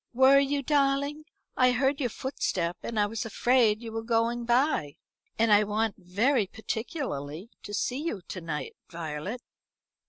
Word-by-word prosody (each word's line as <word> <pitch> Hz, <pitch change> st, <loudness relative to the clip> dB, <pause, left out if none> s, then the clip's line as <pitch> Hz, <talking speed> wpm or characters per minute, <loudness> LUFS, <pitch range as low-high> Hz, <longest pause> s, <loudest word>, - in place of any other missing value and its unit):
"Were 265 Hz, +2 st, +7 dB
you, 280 Hz, 0 st, 0 dB
darling? 280 Hz, +1 st, +1 dB, 0.3 s
I 255 Hz, -1 st, +4 dB
heard 270 Hz, +3 st, +1 dB
your 250 Hz, -4 st, 0 dB
footstep, 185 Hz, -9 st, -2 dB
and 225 Hz, -2 st, -3 dB
I 205 Hz, -, +4 dB
was 220 Hz, +2 st, -3 dB
afraid 230 Hz, -1 st, +2 dB
you 225 Hz, -, -6 dB
were 225 Hz, 0 st, -3 dB
going 230 Hz, +1 st, 0 dB
by. 240 Hz, -, +1 dB, 0.4 s
And 225 Hz, -1 st, +4 dB
I 205 Hz, +1 st, +6 dB
want 215 Hz, +1 st, 0 dB
very 205 Hz, +6 st, +1 dB
particularly 220 Hz, -, -5 dB
to -, -, -9 dB
see 250 Hz, +6 st, -1 dB
you 225 Hz, -, -3 dB
to 185 Hz, -, -6 dB
night, 160 Hz, -3 st, -5 dB
Violet." 165 Hz, +8 st, -5 dB
230 Hz, 155 wpm, -28 LUFS, 205-265 Hz, 0.4 s, Were